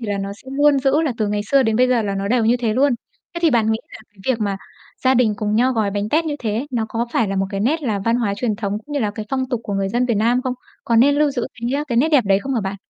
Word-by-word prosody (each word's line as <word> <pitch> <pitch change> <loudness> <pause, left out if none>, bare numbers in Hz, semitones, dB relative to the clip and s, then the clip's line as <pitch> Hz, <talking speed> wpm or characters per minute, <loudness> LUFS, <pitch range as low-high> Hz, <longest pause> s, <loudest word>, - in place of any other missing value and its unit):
thì 230 - -5
là 205 -1 -2
nó 195 0 -4
sẽ 220 +6 -14
luôn 285 0 +4
giữ 275 +3 +2
là 300 -5 0
từ 215 -2 0
ngày 205 0 -1
xưa 275 -1 +5
đến 220 -3 +1
bây 250 +2 +4
giờ 245 -2 +2
là 200 -2 -2
nó 195 0 -2
đều 240 0 +2
như 235 +2 +3
thế 235 -3 -1
luôn. 275 +2 +3 0.4
Thế - - -2
thì 330 - +4
bạn 225 -4 +2
nghĩ 220 - -1
là - - -10
cái 205 - -29
việc 235 - -4
mà 200 -2 -1 0.5
gia 260 0 +4
đình 230 -4 +3
cùng 210 0 -1
nhau 250 +4 +3
gói 220 -4 0
bánh 205 +1 -2
tét 315 +7 +2
như 300 -2 -2
thế, 225 +2 -2
nó 230 -3 -1
có 230 +2 -2
phải 225 - +1
là 195 - -2
một 195 0 +1
cái 195 - -3
nét 300 +9 0
là 220 -7 -1
văn 230 +4 +1
hóa 220 -5 0
truyền 215 -1 -1
thống 205 -1 -2
cũng 295 - -9
như 290 - 0
là 210 -3 0
cái 210 +1 -7
phong 260 -1 -1
tục 245 -4 -2
của 200 - -3
người 195 0 0
dân 240 +4 0
Việt 235 - +1
Nam 235 +4 +2
không? 255 -1 -2 0.3
Có 230 - +1
nên 275 +5 +5
lưu 295 0 +2
giữ 250 -4 -2
cái, 240 +3 -1
a, - - -3
cái 240 - -1
nét 295 +6 +3
đẹp 290 -7 +4
đấy 195 -1 +3
không 270 +6 -3
hả 230 - +1
bạn? 195 0 -4
235 Hz, 340 wpm, -20 LUFS, 210-260 Hz, 0.5 s, xưa